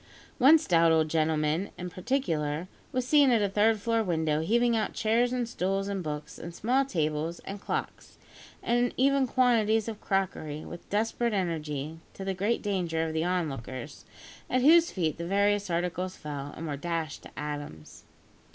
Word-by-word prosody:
One 275 +5 +8
stout 170 - +3
old 160 -1 +3
gentleman, 155 +3 +1
in 180 0 -6
particular, 170 - -1 0.2
was 255 -1 -1
seen 285 -1 +5
at 230 -4 +3
a - - +2
third 210 +2 +2
floor 230 +2 +1
window, 160 -6 0
heaving 235 +7 +2
out 220 - -1
chairs 235 +3 +2
and 250 -2 -1
stools 195 -2 -1
and 200 -1 -2
books, 150 -2 -6
and 170 +1 -8
small 260 +5 +1
tables, 160 - -1
and 195 0 -7
clocks, - - -5 0.5
and 240 +1 +1
even 275 0 +3
quantities 225 -4 +2
of 220 -2 -6
crockery, 155 -6 -2
with 175 - -10
desperate 225 +2 0
energy, 160 -5 -3 0.2
to 195 - -6
the 195 - -1
great 205 +5 -1
danger 175 -6 -1
of 160 - -3
the 160 0 0
onlookers, 145 -6 -3 0.5
at 255 0 +1
whose 330 +3 +6
feet 165 -4 -2
the 170 - -4
various 200 +1 +2
articles 180 +2 -2
fell, 145 -1 -6
and 165 - -5
were 145 -3 -3
dashed 165 0 -3
to - - -11
atoms! 145 - -7
185 Hz, 170 wpm, -28 LUFS, 160-225 Hz, 0.5 s, One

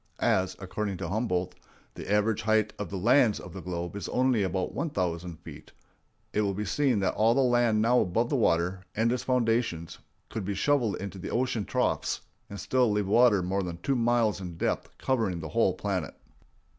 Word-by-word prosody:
As, 95 0 +1
according 100 0 -4
to 85 -2 -4
Humboldt, 90 -4 -1 0.4
the - - -7
average 105 +1 +2
height 110 -1 +2
of 105 -4 -4
the 100 - -4
lands 115 +2 +4
of 90 - -10
the 95 - -7
globe 85 0 -5
is 100 - -5
only 125 -3 +2
about 95 -1 -1
one 165 - -2
thousand 90 - -3
feet, - - -12 0.6
it 105 - +2
will 100 -2 0
be 105 +2 -3
seen 125 +1 +1
that 95 - +1
all 115 +2 +3
the 135 - +3
land 120 -4 +3
now 125 +2 +4
above 115 +7 0
the - - 0
water, 90 -5 +1
and 115 +2 +2
its 125 -1 -1
foundations, 115 -10 0 0.3
could 110 - -5
be 100 +1 -3
shoveled 120 0 +1
into 100 0 -7
the - - -6
ocean 120 -4 -1
troughs - - -1 0.3
and 100 - -7
still 125 +5 +2
leave 105 -1 0
water 105 -2 +4
more 95 +2 -1
than 90 -2 -5
two 135 +10 -1
miles 115 -4 +2
in 90 -3 -7
depth - - -1
covering 110 -10 0
the 80 -1 -6
whole - - +2
planet. - - -3
105 Hz, 195 wpm, -28 LUFS, 90-120 Hz, 0.6 s, lands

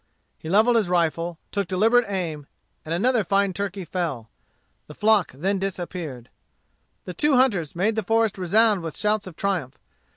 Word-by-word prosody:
He 160 - -7
levelled 220 +6 +4
his 210 -6 +1
rifle, 170 -1 0
took 200 -1 -2
deliberate 225 +5 +3
aim, 165 -7 -3 0.4
and 155 - -8
another 225 +6 +2
fine 195 0 +1
turkey 200 -1 -4
fell. 150 -11 -4 0.6
The 150 - -11
flock 210 -4 +3
then 190 +9 -1
disappeared. 175 -9 -5 0.7
The 180 - -6
two 295 - +2
hunters 200 - +2
made 205 +6 +1
the 220 - 0
forest 225 -1 +1
resound 205 +2 +3
with 165 -1 -6
shouts 210 -1 0
of 180 - -10
triumph. 180 -10 -2
190 Hz, 160 wpm, -24 LUFS, 170-215 Hz, 0.7 s, levelled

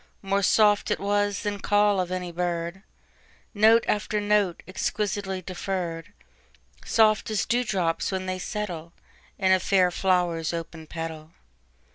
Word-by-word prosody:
More 195 +1 +1
soft 205 +1 +4
it - - 0
was 205 0 0
than 205 -1 -2
call 205 0 +3
of 180 -1 -2
any 180 -1 -3
bird, 170 +1 -3 0.7
Note 220 +2 +5
after 210 0 0
note, 205 -4 +1
exquisitely 195 -1 -2
deferr'd, 180 -1 -4 0.7
Soft 215 -1 +3
as 215 -2 0
dew 245 +1 +1
drops 180 -8 -1
when 190 -1 -3
they 185 0 -3
settleIn 180 -4 -5 0.5
a 190 -1 +3
fair 185 -1 +3
flower's 175 -3 0
open 165 -1 -6
petal. 160 -1 -7
190 Hz, 130 wpm, -26 LUFS, 175-205 Hz, 0.7 s, Note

